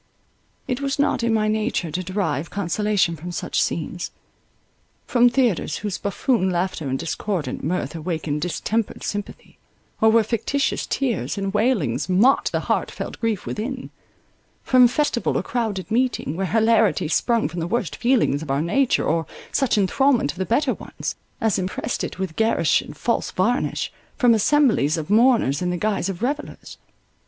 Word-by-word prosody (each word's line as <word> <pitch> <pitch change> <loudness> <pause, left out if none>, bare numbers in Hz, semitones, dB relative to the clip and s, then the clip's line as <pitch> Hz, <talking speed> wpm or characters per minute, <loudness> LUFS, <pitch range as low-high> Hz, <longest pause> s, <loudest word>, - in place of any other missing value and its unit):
It 250 0 -2
was 275 0 -1
not 285 -3 +1
in 230 0 +1
my 215 -1 +2
nature 215 -6 -1
to 180 - -2
derive 180 -5 -2
consolation 200 -2 0
from 170 +3 -7
such - - -1
scenes; - - -2 1.0
from 245 -1 +4
theatres, 240 - +1
whose 200 -3 -2
buffoon 200 0 0
laughter 175 -5 -2
and 130 - 0
discordant 170 +2 -3
mirth 180 +1 -2
awakened 160 -2 -3
distempered 210 +6 -2
sympathy, 205 -1 -6 0.4
or 220 - +6
where 225 0 +5
fictitious 245 +6 -1
tears 255 -6 -1
and 195 0 -2
wailings 210 - +1
mocked 220 +9 +4
the - - 0
heart - - 0
felt - - -7
grief 225 -4 -1
within; 255 +4 -4 0.7
from 255 -1 +6
festival 250 -1 0
or - - -1
crowded 215 -7 -3
meeting, 235 - 0
where 190 +2 -1
hilarity 225 -5 +3
sprung 230 +8 +1
from 175 +1 -6
the 165 - -2
worst 205 -5 -1
feelings 235 - +2
of 160 - -8
our 140 +2 +1
nature, 255 +10 +2
or 160 0 0 0.2
such 270 -5 +1
enthralment 235 - +2
of 175 - -14
the 190 - -1
better 255 +3 +2
ones, - - -6 0.2
as 220 -3 +1
impressed 190 +5 -3
it - - -5
with 185 -4 -4
garish 225 +1 +2
and - - -11
false - - 0
varnish; - - 0 0.3
from 245 -3 +5
assemblies 220 - +3
of 160 +4 -4
mourners 220 - +4
in 180 - 0
the 180 - -1
guise 200 -1 -1
of 195 +3 -5
revellers. 285 +4 -4
210 Hz, 165 wpm, -22 LUFS, 175-240 Hz, 1.0 s, or